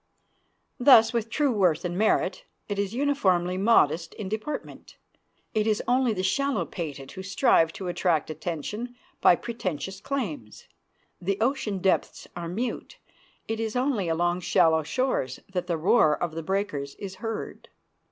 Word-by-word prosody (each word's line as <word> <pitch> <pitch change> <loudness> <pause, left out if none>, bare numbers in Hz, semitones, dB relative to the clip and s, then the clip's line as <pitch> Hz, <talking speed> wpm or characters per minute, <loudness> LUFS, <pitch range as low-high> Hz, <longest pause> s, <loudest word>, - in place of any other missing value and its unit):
Thus 245 -3 +7
with 230 -1 -1
true 285 +2 +1
worth 180 -7 +2
and 175 0 -2
merit: 220 - +1 0.2
it 205 -1 -3
is 200 +2 -2
uniformly 190 -11 +1
modest 175 -5 +3
in 200 -3 -5
deportment. 220 +8 -6 0.6
It 215 -1 +1
is 215 -1 +1
only 250 -1 +3
the 185 -3 -2
shallow 275 +9 +1
pated 145 -6 -6
who 190 - -7
strive 190 -4 +3
to 190 - -6
attract 175 -3 0
attention 210 +10 -5 0.3
by 175 - +7
pretentious 190 -5 -4
claims. 190 - -5 0.5
The 195 +2 -1
ocean 230 -4 0
depths 190 0 0
are 170 -1 -5
mute; 235 - -4 0.5
it 225 0 -2
is 225 0 -3
only 250 -7 0
along 175 +2 +1
shallow 160 -2 +3
shores 155 - -1
that 180 -1 -2
the 170 -2 0
roar 155 -2 +4
of 170 -2 -3
the 165 - -4
breakers 160 -6 -2
is 190 -2 -8
heard. 225 -1 -5
195 Hz, 150 wpm, -26 LUFS, 170-230 Hz, 0.6 s, Thus